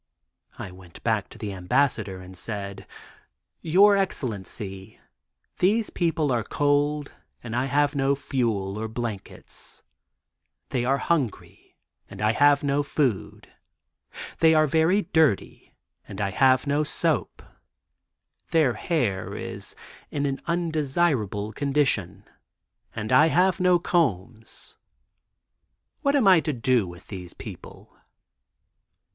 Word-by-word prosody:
I - - -7
went 90 -2 -15
back - - 0
to - - -14
the 105 -2 -5
Ambassador 95 0 0
and 90 0 -12
said: 100 -1 -6 0.7
'Your 195 +5 +5
Excellency, 105 - -4 0.6
those 215 +4 +2
people 160 -4 0
are 120 -2 +1
cold 145 +2 0 0.3
and 115 -1 -5
I 125 +2 +1
have 145 +2 +1
no 140 -1 +1
fuel 110 -8 -2
or 110 - -3
blankets; 110 -3 -8 0.9
they 125 -2 -1
are 135 +2 +2
hungry, 140 -8 -3 0.3
and 100 - -11
I 105 +1 +2
have 145 +5 +4
no 140 0 +1
food; 140 -7 -2 0.9
they 160 0 +5
are 155 0 +5
very 160 +7 +2
dirty, 160 -10 0 0.4
and 95 - -8
I 100 -1 -1
have 130 +4 +3
no 145 +1 +1
soap; 155 -2 -1 1.1
their 155 -7 +3
hair 110 - -2
is - - -7 0.3
in 145 0 -2
an 135 -1 -2
undesirable 150 - 0
condition 110 -9 0 0.7
and 110 0 -4
I 150 +5 +6
have 185 +3 +2
no 180 -1 +4
combs. 115 - -2 1.2
What 280 0 +2
am 260 -8 +3
I 185 -3 +7
to 155 -1 -2
do 120 -4 +1
with 85 0 -12
these 90 -4 -8
people? - - -11
135 Hz, 120 wpm, -25 LUFS, 105-155 Hz, 1.2 s, I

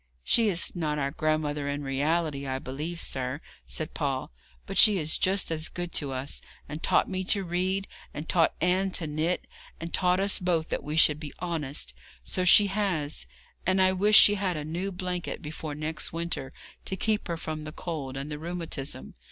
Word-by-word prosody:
'She 225 - +3
is 180 -1 +1
not 155 -3 -1
our 140 -1 -1
grandmother 150 -2 -1
in 145 +1 -3
reality, 140 +1 0
I 130 0 -1
believe 150 +6 -5
sir,' 130 -1 -1 0.3
said 155 +1 -1
Paul; 135 - -2 0.3
'but - - -6
she 210 -3 +7
is 160 -2 +3
just 190 -2 +1
as 155 -1 -2
good 175 -1 -5
to 145 -5 -1
us, 130 +2 -3 0.3
and 150 +2 -6
taught - - +3
me 185 -1 -2
to 200 +1 +3
read, 185 +3 -1 0.2
and 150 +2 -7
taught 165 -2 +3
Anne 185 +3 +2
to 165 - 0
knit, 155 +4 -1 0.3
and 165 +1 -6
taught 180 0 +2
us 200 0 +3
both 170 -3 0
that - - -2
we 150 +1 -4
should 150 -2 +5
be 150 -2 -7
honest 150 - -2 0.3
so 185 - 0
she 190 +3 +7
has, 190 -7 -1 0.4
and 185 +1 +2
I 185 0 +5
wish 205 +3 +5
she 205 - +9
had 190 -4 -1
a 150 - -4
new 175 +5 -3
blanket 180 -1 -4
before 155 -1 -6
next 155 +1 -3
winter 165 -5 -3 0.3
to 190 - -2
keep 215 +2 0
her 170 -1 -2
from 155 -1 -5
the 155 - -6
cold 150 -5 -5
and 140 +3 -5
the 150 - -4
rheumatism. 155 - -5
160 Hz, 195 wpm, -28 LUFS, 150-180 Hz, 0.4 s, she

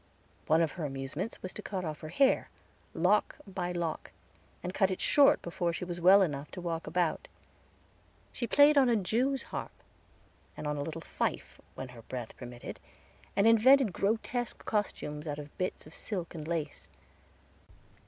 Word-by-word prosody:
One 160 +2 +4
of 160 - 0
her 175 - -6
amusements 140 - -4
was 185 - -5
to - - -6
cut 190 -3 -4
off 155 -1 -4
her 155 - -8
hair, 265 - +3 0.5
lock - - +2
by 185 -3 -3
lock, 170 -2 -3 0.5
and 180 - -4
cut 190 -1 +3
it 185 - -3
short 285 -1 +5
before 170 0 -1
she 175 - -4
was 175 -1 -5
well 190 +3 +8
enough 145 -4 -3
to - - -6
walk 170 -2 -3
about. 175 -3 0 1.0
She 240 - -3
played 290 +2 +6
on 260 -2 +4
a 235 - +4
jewsharp, 240 +7 -1 0.9
and - - -6
on 150 0 -1
a 145 - -3
little 160 +2 -5
fife - - -3
when 130 - -6
her 120 -2 -12
breath 120 -1 -7
permitted, 120 0 -8 0.6
and 200 - +3
invented 230 0 +6
grotesque 230 +5 -1
costumes 155 -7 -2
out 145 -1 -3
of 145 0 -9
bits 185 - -2
of 155 - -13
silk 185 -5 -5
and 155 -3 -7
lace. 150 - -4
175 Hz, 165 wpm, -31 LUFS, 150-210 Hz, 1.0 s, well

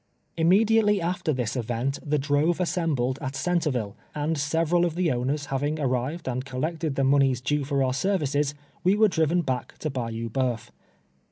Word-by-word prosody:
Immediately 210 +5 +4
after 175 -1 -1
tbis 125 -4 -2
event 125 +3 -2
tbe 150 0 0
drove 145 +5 +1
assembled 150 -8 0
at 135 0 -4
Centreville, 140 - -1 0.2
and 150 +2 0
several 165 +3 +1
of 170 -2 0
tbe 175 -1 +1
owners 135 +4 -1
baving 145 +3 -2
ar 140 - +1
rived 130 +7 -2
and 130 0 -2
collected 150 +3 -3
tbe 135 - +1
monies 135 -2 +3
due 145 +3 0
for 140 0 0
our 130 -1 +1
services, 145 -3 0 0.3
we 185 +3 +4
were 215 +1 +5
driven 170 -1 +1
back 130 -4 -3
to 155 - -3
Bayou 115 -3 -3
Bo3uf. 125 -1 -2
145 Hz, 170 wpm, -26 LUFS, 130-165 Hz, 0.3 s, were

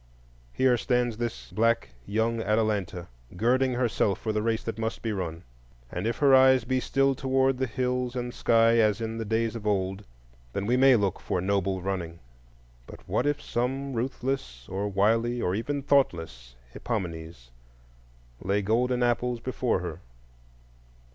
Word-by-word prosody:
Here 125 - +3
stands 120 -2 0
this 120 -1 -5
black 115 +1 +1 0.2
young 110 +2 0
Atalanta, 105 -5 -1 0.3
girding 125 +5 +2
herself 120 -5 0
for 110 - -2
the 105 - 0
race 115 +1 0
that 115 -1 -5
must 110 0 -3
be 115 - -1
run; 85 -3 -4 0.5
and 90 +5 -3
if 115 - -1
her 140 -2 +4
eyes 130 -1 +6
be 130 +2 0
still 135 +1 +2
toward 130 0 +1
the 130 - 0
hills 125 +1 -2
and 120 -1 -3
sky 115 0 +4
as 110 -1 +3
in 115 0 -4
the 115 - -3
days 115 +1 0
of 110 -2 -5
old, 95 -1 -1 0.5
then 100 - -2
we 120 +4 +2
may 130 0 +6
look 100 -5 0
for - - -2
noble 95 0 0
running; 90 -4 -3 0.7
but - - -13
what - - 0
if 145 0 0
some 135 +3 -2
ruthless 120 - -3
or 100 +2 -2
wily 115 +5 +2
or 90 - 0
even 140 +7 -2
thoughtless 80 - 0 0.2
Hippomenes 85 - -5 0.9
lay 100 +2 0
golden 125 +4 +1
apples 120 0 0
before 125 -4 -1
her? 85 -1 -6
115 Hz, 155 wpm, -27 LUFS, 100-125 Hz, 0.9 s, eyes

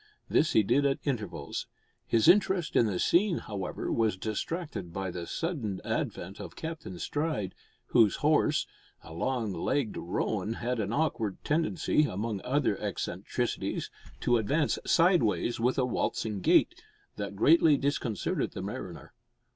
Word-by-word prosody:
This 155 - +2
he 110 - +5
did 140 +8 +2
at 140 -1 +2
intervals. 110 - -3 0.4
His 115 -2 +3
interest 190 -4 +4
in 115 - +5
the 100 -4 -1
scene, 175 - +3
however, 100 -4 -4
was 110 -4 +1
distracted 110 - -4
by 95 +1 -3
the 85 -1 -6
sudden 130 - -3
advent 95 +3 -3
of - - -8
Captain 160 - -6
Stride, 145 - -2 0.4
whose 110 -5 +5
horse - - +3 0.4
a 80 - -11
long 115 +3 -1
legged 110 +7 -1
roan 105 +4 -2
had 120 +1 -2
an 105 -1 -1
awkward 120 -8 0
tendency, 155 0 +1
among 105 -3 -3
other 130 -5 +1
eccentricities, - - -3 0.3
to 120 - +3
advance 140 +7 +1
sideways 165 - +3
with 125 +3 +1
a 130 - +3
waltzing 110 -3 -1
gait, - - +4 0.4
that 100 -1 -4
greatly 155 +6 +5
disconcerted 135 -6 -1
the - - -5
mariner. - - -7
115 Hz, 140 wpm, -29 LUFS, 100-150 Hz, 0.4 s, he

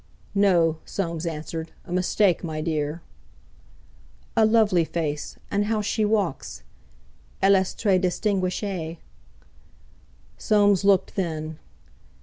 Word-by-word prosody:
"No," 175 -6 +3
Soames 170 -3 -3
answered; 160 +1 -5
"a 175 - -11
mistake, 185 +1 +2
my 160 -2 -4
dear." 155 0 -2 1.3
"A 220 -1 +5
lovely 215 -6 +4
face! 155 -3 -3 0.2
And 205 +1 +1
how 215 0 0
she 215 +1 0
walk! 205 -8 0 1.0
Elle 195 +1 +5
est 190 0 -2
très 195 -4 +3
distinguée!" 185 -2 -1 1.4
Soames 205 -2 +3
looked 195 -1 +3
then. 160 -4 -3
185 Hz, 105 wpm, -24 LUFS, 160-205 Hz, 1.4 s, A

